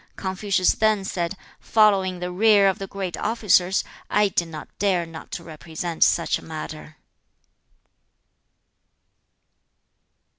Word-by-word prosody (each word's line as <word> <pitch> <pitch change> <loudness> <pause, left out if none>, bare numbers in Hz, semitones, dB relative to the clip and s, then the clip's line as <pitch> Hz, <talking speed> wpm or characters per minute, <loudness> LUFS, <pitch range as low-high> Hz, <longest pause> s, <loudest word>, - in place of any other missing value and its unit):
Confucius 190 0 0
then 215 -3 +1
said, 175 0 -3 0.2
'Following 200 -4 +3
in - - -10
the 180 0 -3
rear 205 +1 +5
of 190 - 0
the 195 - -5
great 190 -3 -5
officers, 200 -4 +2 0.3
I 210 0 +3
did 170 -2 -1
not 155 -2 -8
dare 190 -4 +1
not 165 -1 -11
to 170 - -5
represent 165 +1 -3
such - - +2
a - - -15
matter.' 155 -1 -8
185 Hz, 120 wpm, -23 LUFS, 170-200 Hz, 0.3 s, rear